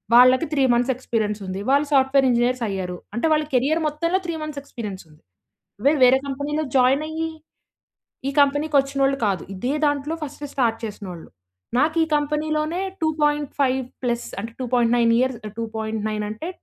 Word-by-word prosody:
వాళ్ళకి 255 +5 +7
3 280 -2 +2
months 245 +2 +2
experience 220 -4 -2
ఉంది. 185 +1 -4
వాళ్ళు 285 +1 +3
సాఫ్ట్‌వేర్ 270 0 +4
ఇంజినీర్స్ 240 +1 +1
అయ్యారు. 185 -3 -3 0.2
అంటే 240 - -1
వాళ్ళ 305 0 +2
కేరియర్ 285 +6 +2
మొత్తంలో 335 +5 0
3 340 - -2
మంత్స్ 300 -2 -5
ఎక్స్‌పీరియన్స్ 210 -8 -7
ఉంది. 150 0 -21 0.6
వేర్ 290 0 +4
వేరే 255 +1 +6
కంపెనీలో 290 +3 -2
జాయిన్ 260 +3 +4
అయ్యి 320 +1 -3 1.0
ఈ - - +1
కంపెనీకి 290 +2 +2
వచ్చినోళ్ళు 275 0 0
కాదు. 195 -3 0
ఇదే 245 +8 -2
దాంట్లో 290 +1 0
ఫస్ట్ 295 0 -6
స్టార్ట్ 230 -4 +1
చేసినోళ్ళు. 195 -6 -7 0.5
నాకు 310 +4 +2
ఈ - - -7
కంపెనీ‌లోనే 305 +3 -1 0.2
2.5 295 -4 +1 0.3
ప్లస్ 240 -1 -1
అంటే, 225 +3 -6
2.9 240 -2 +2
ఇయర్స్ 260 -2 0
ఆహ్, 210 - -14
2.9 220 -1 -3
అంటే 225 +11 -5
265 Hz, 150 wpm, -23 LUFS, 230-295 Hz, 1.0 s, వాళ్ళకి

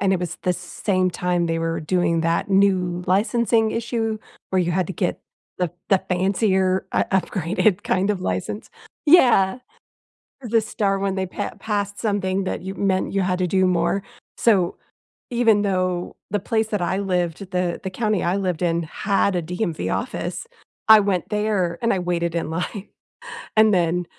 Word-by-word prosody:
and 195 -1 +2
it 185 - +1
was 175 -2 -4
the 180 - +2
same 185 +1 -1
time 175 -1 0
they 165 0 -1
were 165 0 -2
doing 170 0 +1
that 165 +4 0
new 185 -3 +2
licensing 220 +3 +2
issue 225 -1 -2 0.3
where 190 -1 +2
you 175 - 0
had 185 -1 0
to 190 - -5
get 180 -1 -2 0.4
the 180 -2 0 0.2
the 195 -2 +3
fancier 190 0 +1
u - - +2
upgraded 190 +2 +1
kind 195 +3 +1
of 200 - -1
license. 100 - -3 0.4
Yeah. 245 - +5 0.8
The 230 -1 +2
star 200 -2 -1
one, 195 -1 -1
they 190 -1 -1
pa 180 - -4
passed 205 -2 -2
something 195 -3 -1
that 185 - -3
you 190 +1 -5
meant 190 -1 0
you 195 -1 +1
had 180 0 0
to 180 - +2
do 185 +1 +2
more. 185 +2 +1 0.3
So, 195 -7 +2 0.5
even 230 -4 +3
though 185 -2 -1
the 205 - 0
place 220 +2 0
that 210 -3 -2
I 190 +2 0
lived 180 -1 -2
the 180 -1 0
the 190 - -4
county 215 -1 0
I 175 +3 +1
lived 180 -3 -2
in 170 -1 +1
had 195 +2 0
a 175 - 0
DMV 175 0 -3
office, - - -4 0.4
I 220 -1 +10
went 195 -4 -1
there 210 -5 0
and 230 +1 +2
I 190 - 0
waited 170 -1 -1
in 170 - -1
line. 180 +5 -4 0.7
And 215 -1 +6
then 175 0 +1
190 Hz, 175 wpm, -22 LUFS, 180-205 Hz, 0.8 s, I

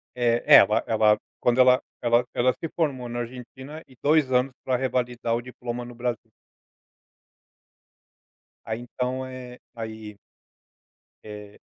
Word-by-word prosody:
Eh, 120 -1 +1
é. - - +8
Ela 105 +3 +6
ela 110 -1 +4 0.2
quando 120 +1 +1
ela 125 0 +5 0.2
ela 120 0 +3
ela 130 +1 +3
se 165 - -6
formou 140 -7 -1
na 120 0 -4
Argentina 130 +5 -8
e 130 - -19
2 150 -2 +3
anos 125 +1 +2
pra 130 - 0
revalidar 125 -2 -1
o 120 - -2
diploma 120 -1 -6
no 120 - -11
Brasil. 120 -1 -4 2.3
Aí, 110 +2 -4
então 125 +1 -3
é 125 -1 -9 0.2
aí 110 -2 -8 1.1
eh, 105 -1 -11
125 Hz, 135 wpm, -25 LUFS, 115-130 Hz, 2.3 s, é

